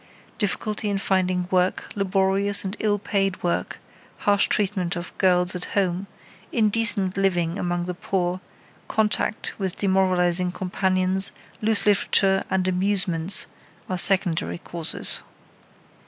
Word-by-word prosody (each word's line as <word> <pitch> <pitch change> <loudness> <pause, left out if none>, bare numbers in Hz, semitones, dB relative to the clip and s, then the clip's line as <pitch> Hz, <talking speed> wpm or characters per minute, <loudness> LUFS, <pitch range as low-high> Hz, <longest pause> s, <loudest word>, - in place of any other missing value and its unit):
Difficulty 210 +1 -2
in 200 - 0
finding 185 -2 0
work, 185 0 0
laborious 195 0 +2
and 190 +2 -3
ill 210 -1 +1
paid 195 -2 -1
work, 175 - -1 0.4
harsh 205 -1 +2
treatment 195 -3 -1
of 175 0 -7
girls 180 -1 +2
at 180 - -2
home, 190 0 0 0.4
indecent 215 -3 +1
living 180 -2 0
among 175 0 -1
the 180 - -3
poor, 180 0 -2 0.5
contact 215 0 0
with 190 -3 -2
demoralizing 185 -2 +2
companions, 185 0 +1 0.3
loose 220 0 +2
literature 195 -1 +3
and 185 -1 0
amusements 185 -2 +2 0.4
are 185 - -2
secondary 180 -4 +3
causes. 170 -1 -4
190 Hz, 115 wpm, -24 LUFS, 180-200 Hz, 0.5 s, literature